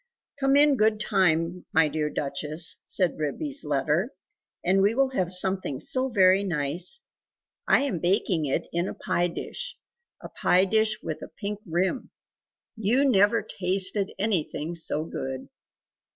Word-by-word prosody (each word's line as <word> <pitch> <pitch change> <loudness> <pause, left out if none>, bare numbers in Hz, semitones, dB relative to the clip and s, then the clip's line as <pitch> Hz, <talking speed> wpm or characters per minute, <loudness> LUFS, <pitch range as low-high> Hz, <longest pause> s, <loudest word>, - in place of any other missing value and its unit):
"Come 270 0 +3
in 290 -1 +5
good 215 -1 +2
time, 180 -3 0
my 160 -1 +4
dear 150 0 -2
Duchess," 150 +3 0
said 185 -5 +1
Ribby's 280 - -3
letter, 150 - 0 0.5
"and 190 +2 +3
we 205 +3 +2
will 270 0 +2
have 185 -9 -1
something 185 -7 +1
so 260 0 0
very 190 -3 +4
nice. 170 - -1 0.7
I - - +4
am 245 -12 -2
baking 175 -2 +1
it 135 - -2
in 170 +2 0
a - - -6
pie 175 0 0
dish - - -6 0.4
a - - -9
pie 185 +2 +2
dish 215 +1 +1
with - - -5
a - - -7
pink 210 0 -6
rim. 185 +9 -1 0.7
You 235 +6 +2
never 210 -1 +3
tasted 190 +2 0
anything 175 -6 -1
so 160 -2 -3
good! 130 -4 -6
185 Hz, 145 wpm, -26 LUFS, 160-215 Hz, 0.7 s, in